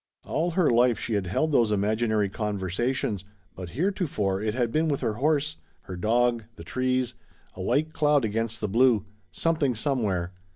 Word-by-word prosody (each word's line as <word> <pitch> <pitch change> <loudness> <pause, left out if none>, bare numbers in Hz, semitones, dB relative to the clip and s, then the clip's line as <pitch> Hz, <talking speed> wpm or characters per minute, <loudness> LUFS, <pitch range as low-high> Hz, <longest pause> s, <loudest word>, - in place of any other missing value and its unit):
All 165 +4 0
her 175 0 +2
life 120 -1 +4
she 115 - -3
had 100 -3 0
held 155 - 0
those 115 -6 +3
imaginary 105 +1 +1
conversations, 105 +2 -2 0.3
but 90 -2 -8
heretofore 145 - 0
it 110 0 -1
had 120 -3 0
been 155 +4 +1
with 145 -3 -1
her 115 -4 0
horse, 150 +4 0 0.2
her 95 - -8
dog, 115 +4 +1
the - - -10
trees, 130 -1 -1 0.4
a 90 - -8
white 155 +11 0
cloud 150 -4 +3
against 110 +1 -2
the 105 - 0
blue, 115 -1 +3 0.3
something 145 - 0
somewhere. 105 -8 -1
120 Hz, 165 wpm, -26 LUFS, 105-140 Hz, 0.4 s, life